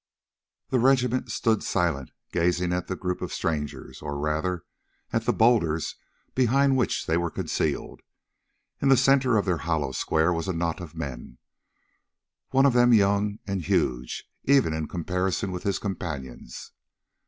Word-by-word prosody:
The 130 - +2
regiment 125 0 +2
stood 110 -2 +1
silent, 75 -7 -1 0.2
gazing 90 +1 +1
at 90 0 -2
the 95 - -2
group 90 -1 -3
of - - -4
strangers, 75 -4 -3
or, 75 -1 -4
rather, 80 +4 -1 0.5
at - - 0
the - - +3
boulders 85 -10 +2 0.4
behind 135 +2 +3
which 125 - 0
they 80 - +1
were 85 0 0
concealed. - - -2 0.8
In 140 - +3
the 135 - +7
centre 130 -4 +4
of 100 - +1
their 90 -3 +1
hollow 75 -3 -1
square 80 +5 +1
was 85 0 -3
a 95 - 0
knot 85 +1 -1
of 85 -2 -9
men, 65 -6 -6 1.1
one 135 +1 +4
of 140 - +4
them 120 0 +5
young, 100 0 +3
and 95 -2 -2
huge 60 -5 -1 0.2
even 135 - +4
in 80 -1 -2
comparison 90 +2 -2
with 90 -1 -4
his 100 - 0
companions. 70 -11 -6
90 Hz, 155 wpm, -26 LUFS, 80-115 Hz, 1.1 s, the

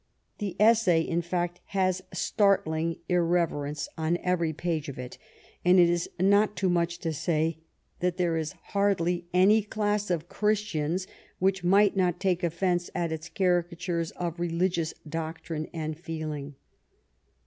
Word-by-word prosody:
The 200 -4 -3
essay, 215 -6 +5
in 170 +1 -1
fact, 175 0 -2 0.2
has 185 -1 +2
startling 165 -6 +1
irreverence 165 -4 0
on 160 +2 +1
every 175 -3 +1
page 160 -1 -2
of 140 - -7
it, 125 0 -8 0.4
and 180 +1 +6
it 175 - +7
is 170 0 0
not 200 +3 +4
too 190 - +1
much 170 -1 +1
to 165 -2 -1
say 160 +1 0 0.4
that 180 0 0
there 175 -3 +1
is 160 -2 -2 0.2
hardly 180 -4 +1
any 195 +5 +5
class 210 -1 -1
of 170 -2 -1
Christians 190 -5 0 0.3
which 190 0 +1
might 200 +3 +4
not 180 -2 +1
take 185 -2 +1
offence 175 +1 0
at 170 -2 -1
its 160 +1 -5
cari 180 -3 +2
catures 170 -1 -3
of 170 -1 -4
religious 170 -1 0
doctrine 160 0 -4
and 155 -2 -4
feeling. 155 -4 -5
175 Hz, 145 wpm, -28 LUFS, 165-185 Hz, 0.4 s, it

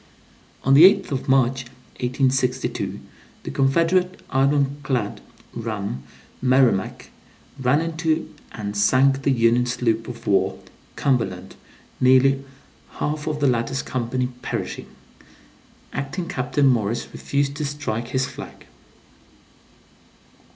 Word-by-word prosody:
(On 135 - +4
the 140 - +8
8th 195 0 +6
of 135 -1 -3
March, 130 -1 +2 0.4
1862, 130 0 0 0.4
the - - -5
Confederate 170 +7 +2
iron 140 +1 +2
clad 125 -7 -2 0.3
ram, 105 - -4 0.4
Merrimac, 125 -6 +2 0.5
ran 130 +4 +2
into 165 -1 -1 0.2
and 105 -2 -5
sank 135 +6 +3
the 140 - +1
Union 120 -1 +3
sloop 115 -2 0
of - - -9
war, - - +2 0.4
Cumberland, 95 -9 -1 0.4
nearly 130 +1 +4 0.6
all 150 - 0 0.2
of 150 -1 -3
the 145 - +1
latter's 130 +1 0
company 125 0 -2
perishing. - - -4 1.1
Acting 140 +6 -4
captain 130 +2 0
Morris 115 -4 +1
refused 140 0 -1
to 150 - -2
strike 140 -6 -3
his 130 +1 0
flag.) - - -10
130 Hz, 110 wpm, -23 LUFS, 120-140 Hz, 1.1 s, the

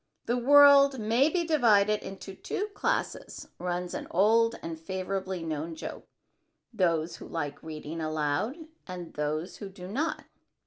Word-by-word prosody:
"The 240 - +1
world 280 +1 +7
may 235 +6 +3
be 345 +1 0
divided 215 -9 +3
into 195 0 -8
two 405 - -4
classes," - - -3
runs 180 0 -3
an - - -5
old 225 +5 +3
and 165 -1 -5
favorably 190 +1 -4
known 160 +1 -4
joke, - - -8 0.7
"those 170 -5 0
who - - -10
like 145 -3 -4
reading 160 0 -6
aloud 155 - -1 0.3
and 180 -2 -7
those 155 +4 -3
who 200 - -7
do 185 -2 -10
not. 280 - -2
190 Hz, 140 wpm, -28 LUFS, 165-230 Hz, 0.7 s, world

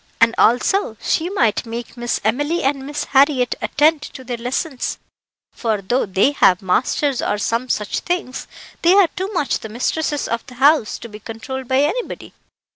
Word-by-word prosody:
And, 230 0 +5
also, 245 - +2
she 330 +2 0
might 235 - +1
make 235 0 -7
Miss 240 -1 -2
Emily 290 +10 0
and 270 0 -1
Miss 295 0 -3
Harriett 270 -2 +3
attend 300 +2 +2
to 265 -2 -9
their 245 -1 -4
lessons, 255 +3 -3 0.5
for, 220 -3 -1
though 215 +5 0
they 195 +8 +3
have 185 -10 +3
masters 255 +8 +1
or 210 - 0
some 230 +4 -1
such 210 -3 -1
things, 350 -7 -3 0.3
they 350 +3 +5
are 395 -4 +5
too 375 +3 -4
much 300 -7 0
the 220 - -8
mistresses 290 +6 -1
of 235 0 -2
the 250 - -12
house 275 -2 +3
to - - -9
be 210 -1 -11
controlled 255 +4 -7
by 260 +2 +3
anybody." 450 +12 -3
255 Hz, 175 wpm, -20 LUFS, 230-295 Hz, 0.5 s, And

